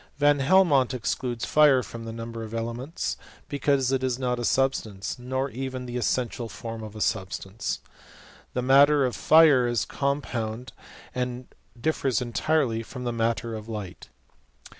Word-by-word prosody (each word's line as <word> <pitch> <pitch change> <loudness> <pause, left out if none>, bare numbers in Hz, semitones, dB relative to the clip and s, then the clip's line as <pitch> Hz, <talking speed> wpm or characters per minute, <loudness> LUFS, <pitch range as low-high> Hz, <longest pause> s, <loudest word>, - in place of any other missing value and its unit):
Van 145 0 +4
Helmont 140 -4 +4
excludes 120 0 -2
fire 145 -4 +5
from 115 0 -8
the 115 - -5
number 115 0 -6
of 110 0 -6
elements, 120 +8 -3 0.3
because 140 -2 +1
it 130 -1 0
is 130 -2 0
not 125 -2 -1
a - - -3
substance, 115 -6 0
nor 130 +2 -2
even 130 +1 -5
the 120 0 -6
essential 120 0 -1
form 115 0 -7
of 110 -1 -8
a - - -7
substance. 95 0 -2 0.7
The 125 - 0
matter 140 +2 +6
of 125 - -2
fire 155 -6 +6
is 120 -2 0
compound, 125 -4 -3 0.4
and 125 0 -4 0.3
differs 135 -3 0
entirely 120 0 0
from 125 +2 -8
the 120 -1 -2
matter 115 0 -1
of 110 0 -7
light. 105 -5 -7
125 Hz, 150 wpm, -26 LUFS, 115-135 Hz, 0.7 s, matter